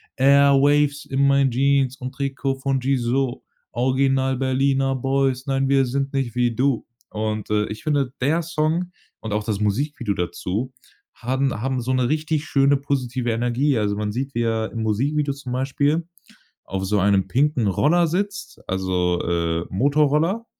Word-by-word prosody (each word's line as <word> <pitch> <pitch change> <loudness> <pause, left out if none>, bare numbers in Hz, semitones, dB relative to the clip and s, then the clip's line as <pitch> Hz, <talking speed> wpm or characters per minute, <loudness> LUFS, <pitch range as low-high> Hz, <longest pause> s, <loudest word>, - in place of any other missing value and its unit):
„Airwaves 140 +1 +4
in 140 +1 +1
mein 140 -1 +3
Jeans 135 +1 +2
und 130 -1 -6
Trikot 135 -1 -2
von 135 -1 0
Gizo, 130 0 -1 0.3
Original 130 +1 +1
Berliner 135 0 +1
Boys. 135 0 0
Nein, 135 0 +1
wir 135 -1 +4
sind 135 +2 -2
nicht 135 -4 -1
wie 120 -2 +1
du.“ 130 -2 0 0.2
Und, 110 -1 -3
äh, 105 0 +1
ich 105 0 -7
finde, 140 -4 0
der 155 +6 +2
Song 170 +2 -1 0.3
und 110 -2 -5
auch 105 0 -1
das 105 -2 -2
Musikvideo 115 +2 -1
dazu 90 +7 -3 0.4
haben 130 +2 -1
haben 130 -1 -1
so 125 - -2
'ne 130 -1 +1
richtig 155 0 -1
schöne 140 -1 +3
positive 130 -3 -2
Energie. 120 +4 +1
Also 105 -1 0
man 105 0 -2
sieht, 135 +3 -3
wie 120 - +1
er 110 -1 -1
im 115 - -4
Musikvideo 140 +7 0
zum 135 -2 -8
Beispiel 140 +5 0 0.6
auf 95 0 -4
so 100 +1 +1
einem 100 0 +2
pinken 135 -3 +1
Roller 155 - +3
sitzt, 200 +5 -3
also, 90 -2 0
äh, 85 -1 -1
Motorroller 150 - +1
135 Hz, 155 wpm, -22 LUFS, 115-140 Hz, 0.6 s, Airwaves